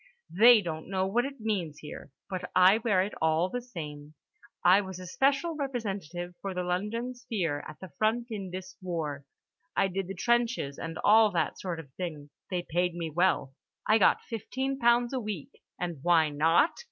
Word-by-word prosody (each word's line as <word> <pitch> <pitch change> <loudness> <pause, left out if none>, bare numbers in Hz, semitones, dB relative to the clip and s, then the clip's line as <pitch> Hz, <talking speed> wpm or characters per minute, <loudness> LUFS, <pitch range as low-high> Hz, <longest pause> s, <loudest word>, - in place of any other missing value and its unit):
"They 225 +4 +7
don't 160 -1 -5
know 190 -1 0
what 235 +6 +1
it 275 -1 -7
means 190 -9 -2
here, 150 - -9 0.2
but 185 -2 -5
I 185 +4 +6
wear 205 -5 +2
it 200 - -5
all 160 +3 +2
the 245 +5 -3
same. 150 -9 -8 0.5
I 185 +3 +7
was 190 -2 -7
a 185 - -8
special 275 - +1
representative 195 - -4
for 195 -2 -4
The 180 - -1
London 210 +8 -2
Sphere 195 - -3
at 150 - -10
the 185 -3 -10
front 235 +2 +1
in 195 -4 -4
this 185 +1 -7
war. 155 -6 -4 0.5
I - - +3
did 190 0 -3
the 195 - -6
trenches 235 - 0
and 165 -1 -5
all 220 +1 +6
that 165 -3 -1
sort 175 -3 -4
of 145 -5 -11
thing. 155 -5 -5 0.2
They 180 -3 -2
paid 175 +1 0
me 165 -2 -4
well; 170 -5 +1 0.3
I 220 +1 +4
got 190 - +4
fifteen 265 +4 -3
pounds 240 +1 +3
a 260 - 0
week. 210 - -6 0.2
And 175 -4 -3
why 165 -3 +4
not? 165 - +4
185 Hz, 185 wpm, -29 LUFS, 165-225 Hz, 0.5 s, They